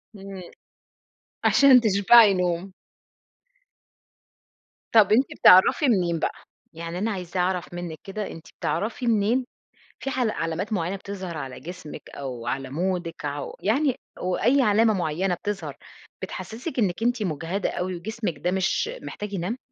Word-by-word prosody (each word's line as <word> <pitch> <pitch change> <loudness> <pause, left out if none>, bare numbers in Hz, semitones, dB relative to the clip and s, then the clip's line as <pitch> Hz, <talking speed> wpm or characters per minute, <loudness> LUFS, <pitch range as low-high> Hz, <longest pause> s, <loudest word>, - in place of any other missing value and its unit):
امم، 195 -1 -9 1.0
عشان 275 -3 +7
تشبعي 210 0 +6
نوم. 180 0 -1 2.2
طب 215 -4 +6
أنتِ 245 +6 +5
بتعرفي 190 - +7
منين 175 -8 +2
بقى؟ - - 0 0.4
يعني 165 +1 -6
أنا 215 +4 -1
عايزة 180 -2 -4
أعرف 180 -1 -1
منِك 175 -2 -5
كده، 200 +1 -5
أنتِ 165 - -10
بتعرفي 215 +10 -2
منين 230 +3 +2 0.5
في - - -4
ح 260 - -3
علامات 200 -3 -1
معينة 180 -1 -1
بتظهر 190 -3 -6
على 135 -3 -6
جسمِك 170 -2 -9
أو 125 -4 -7
على 135 +1 -3
مودِك 175 +1 -3
أو 145 0 -4
ع - - -12
يعني 265 +4 +2 0.2
وأي 230 +9 +2
علامة 220 -1 +4
معينة 180 0 -1
بتظهر، 205 +3 -5 0.5
بتحسسِك 250 +5 -5
إنك 195 -1 0
أنتِ 240 -1 +1
مجهدة 175 +3 -2
أوي 180 +1 -3
وجسمِك 205 -2 -4
ده 175 +5 -1
مش 190 - 0
محتاج 210 0 -6
ينام؟ 195 +6 -2
190 Hz, 135 wpm, -25 LUFS, 170-220 Hz, 2.2 s, عشان